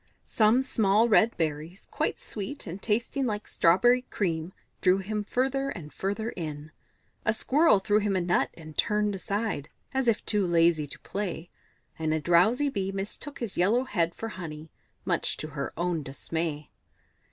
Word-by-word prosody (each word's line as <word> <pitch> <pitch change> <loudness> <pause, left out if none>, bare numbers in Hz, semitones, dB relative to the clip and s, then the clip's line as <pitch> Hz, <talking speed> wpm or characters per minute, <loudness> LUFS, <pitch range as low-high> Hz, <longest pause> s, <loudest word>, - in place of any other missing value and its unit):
Some 225 +4 +3
small 220 -3 +3
red 225 +1 +4
berries, 160 +3 -3
quite - - -1
sweet 225 +7 -5
and 185 +1 -7
tasting 240 +5 0
like 210 -1 -3
strawberry 240 +9 +4
cream, 170 -8 -2 0.3
drew 185 0 +4
him 210 +2 -3
further 270 +5 0
and 165 - -8
further 205 +4 -2
in; 155 -5 -6 0.5
a 215 - +3
Squirrel 285 +5 +4
threw 205 +2 +2
him 205 -2 0
a 185 - +2
nut 175 0 +2
and 155 -2 -11
turned 210 0 +1
aside, 195 -5 -2 0.2
as 265 -2 0
if 225 -2 +2
too 205 -3 +2
lazy 165 -3 +3
to - - -9
play, 180 -4 -4 0.5
and 160 -1 +1
a - - 0
drowsy 180 - +3
Bee 195 -8 -2
mistook 200 +9 -6
his 230 -5 -3
yellow 220 +8 +3
head 170 -9 -1
for 225 - -5
honey, 160 -5 -8 0.3
much - - 0
to 155 - -6
her 140 -1 -4
own 170 -1 0
dismay. 150 +2 -4
195 Hz, 165 wpm, -28 LUFS, 165-220 Hz, 0.5 s, red